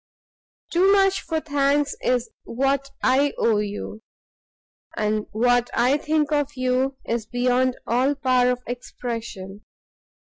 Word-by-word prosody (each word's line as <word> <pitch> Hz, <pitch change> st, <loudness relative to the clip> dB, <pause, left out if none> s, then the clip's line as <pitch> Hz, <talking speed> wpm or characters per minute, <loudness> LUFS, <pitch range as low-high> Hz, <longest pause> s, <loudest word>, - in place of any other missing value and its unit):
Too 370 Hz, +3 st, +4 dB
much 390 Hz, -1 st, +3 dB
for 325 Hz, -1 st, -2 dB
thanks 285 Hz, -1 st, +1 dB
is 245 Hz, -2 st, 0 dB
what 275 Hz, +3 st, -1 dB
I 275 Hz, +2 st, +3 dB
owe 220 Hz, -2 st, +2 dB
you, 210 Hz, +1 st, -5 dB, 1.0 s
and 210 Hz, 0 st, -1 dB
what 245 Hz, +3 st, +2 dB
I 260 Hz, +5 st, +3 dB
think 305 Hz, 0 st, 0 dB
of 290 Hz, -1 st, 0 dB
you 255 Hz, +1 st, 0 dB
is 230 Hz, -2 st, -2 dB
beyond 250 Hz, +2 st, +1 dB
all 255 Hz, +5 st, +1 dB
power 255 Hz, -2 st, +2 dB
of 250 Hz, 0 st, -2 dB
expression. 230 Hz, -5 st, -6 dB
255 Hz, 125 wpm, -23 LUFS, 235-285 Hz, 1.0 s, Too